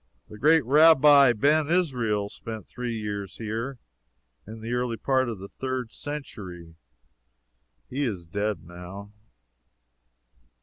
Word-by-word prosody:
The 105 - -11
great 155 +2 +4
Rabbi 145 -1 +7
Ben 145 +6 +2
Israel 125 - +1
spent 110 0 -8
three 120 -2 -4
years 100 -3 -5
here 115 +4 -4 0.7
in 110 +1 -9
the 115 +2 -4
early 125 -2 -1
part 130 -1 +1
of 115 - -5
the 95 +1 -9
third 130 0 -4
century. 95 - -8 1.1
He 135 +3 -4
is 95 -8 -4
dead, 100 +5 -2
now. 90 +4 -10
115 Hz, 120 wpm, -26 LUFS, 100-135 Hz, 1.1 s, Rabbi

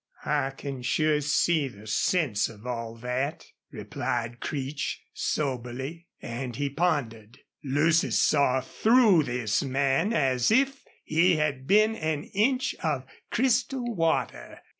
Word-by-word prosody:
"I 145 -3 +1
can 135 -1 -7
sure 150 +4 +1
see 150 +1 +2
the 105 -4 -13
sense 115 - +1
of 110 0 -14
all 115 -2 -4
that," 125 +5 -3 0.2
replied 120 0 -4
Creech, 140 0 -3
soberly. 135 +4 -3
And 120 0 -5
he 140 +2 -2
pondered. 130 -9 -1 0.3
Lucy 155 +4 +2
saw 135 -3 +3
through 220 - +4
this 120 -5 0
man 135 - +1
as 130 - +2
if 270 +4 +2 0.2
he 170 +3 +3
had 145 -4 -1
been 215 +2 +4
an 155 -5 -2
inch 255 +6 +1
of 145 -5 -1 0.2
crystal 250 0 0
water. 165 - -1
145 Hz, 120 wpm, -27 LUFS, 125-170 Hz, 0.3 s, through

